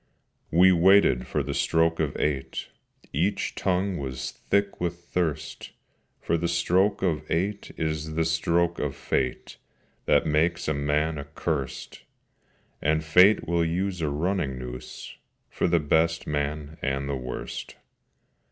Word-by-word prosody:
We 90 +3 +6
waited 90 -7 +5
for - - -1
the - - -3
stroke 80 0 +2
of 75 -3 -1
eight: 70 -3 -2 0.4
Each 90 +8 0
tongue 95 0 0
was 65 -2 -4
thick 100 -2 -1
with 85 -1 -1
thirst: 85 -3 -3 0.5
For 85 - 0
the 85 +1 -1
stroke 95 +4 +2
of 80 -5 +1
eight 100 +5 -1
is 80 0 -2
the 80 0 +1
stroke 85 +1 +1
of 75 -2 -2
Fate 65 -2 -2 0.5
That - - +3
makes 80 +3 +1
a 75 - +2
man 75 +2 0
accursed, 70 -2 -4 0.8
And 75 +1 +1
Fate 90 +5 +5
will 85 0 +2
use 90 +2 -1
a 75 - 0
running 75 -2 -1
noose 65 0 -8 0.3
For - - 0
the 85 -1 +3
best 80 +2 +1
man 75 +1 -3
and 70 0 -1
the 70 - -1
worst. 65 -1 -6
80 Hz, 135 wpm, -26 LUFS, 75-85 Hz, 0.8 s, We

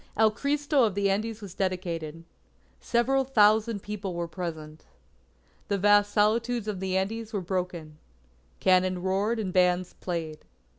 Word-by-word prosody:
El 220 0 +5
Cristo 285 +3 +1
of 210 -4 +1
the 200 -1 +2
Andes 220 +2 -2
was 195 -4 -8
dedicated. 170 -4 -3 0.6
Several 265 +3 +1
thousand 215 -4 +3
people 205 -3 -5
were 170 0 -3
present. 160 -3 -7 0.8
The 200 - 0
vast 205 +1 +4
solitudes 225 +2 +1
of 205 -3 -3
the 190 0 -1
Andes 220 +4 -3
were 205 - 0
broken. 175 -4 -4 0.6
Cannon 185 -1 +2
roared 200 +5 0
and 195 -5 -3
bands 180 -1 +2
played. 165 -4 -5
195 Hz, 140 wpm, -27 LUFS, 180-220 Hz, 0.8 s, El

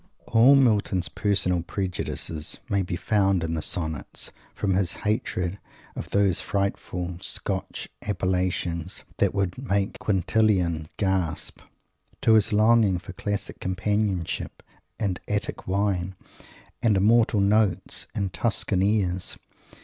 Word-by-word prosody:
All 125 +5 +6
Milton's 105 -8 +2
personal 90 -4 +1
prejudices 85 -3 -3
may 100 -1 +2
be 90 -1 -3
found 95 -2 +2
in 80 0 -2
the 80 - -1
Sonnets, 80 -2 -3 0.2
from 100 -2 0
his 90 -2 +1
hatred 100 -3 -1 0.4
of - - -6
those 100 -3 +2
frightful 90 -3 -2
Scotch 95 0 -3
appellations 90 -2 -1
that 100 -2 +2
would 95 +1 -1
"make 100 -6 -1
Quintlian 95 -5 +1
gasp" 95 -5 -1 0.6
to 110 - +6
his 110 -2 +4
longing 110 -2 +4
for 85 - -9
Classic 105 -1 -3
companionship 95 -1 -1 0.3
and 95 -4 -1
"Attic 105 +1 -3
wine" 95 -1 0 0.7
and 105 -4 +3
"immortal 110 +2 +4
notes" 100 -1 +2
and 95 -2 -1
"Tuscan 105 -4 0
airs"! 95 -3 0
95 Hz, 115 wpm, -26 LUFS, 90-105 Hz, 0.7 s, All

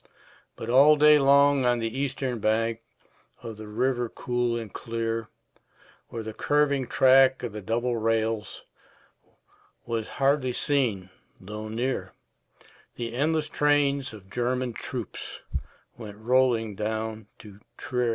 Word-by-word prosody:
But 115 - -7
all 140 +5 +6
day 150 0 +6
long 140 0 +5
on 125 -1 +3
the 115 0 -3
eastern 135 -3 -2
bank 115 +2 0 0.6
Of 115 -2 -7
the 110 0 -9
river 120 +2 -1
cool 120 -1 -1
and 110 -4 -7
clear, 115 -1 -3 0.8
Where 115 - -6
the 110 0 -6
curving 140 0 +1
track 130 +1 +5
of 120 - -3
the 105 +1 -7
double 120 +4 -1
rails 110 -1 -1 1.2
Was 115 -2 -3
hardly 135 -2 +2
seen 115 -11 0 0.3
though 105 +3 -7
near, 120 +4 -3 0.8
The 115 -1 -5
endless 155 +4 0
trains 145 -2 +1
of 105 -4 -13
German 125 0 -1
troops 120 -2 -7 0.5
Went 105 -3 -10
rolling 120 -1 +2
down 110 +1 -4
to 105 -2 -14 0.2
Trier. 125 -1 -1
120 Hz, 125 wpm, -26 LUFS, 110-135 Hz, 1.2 s, all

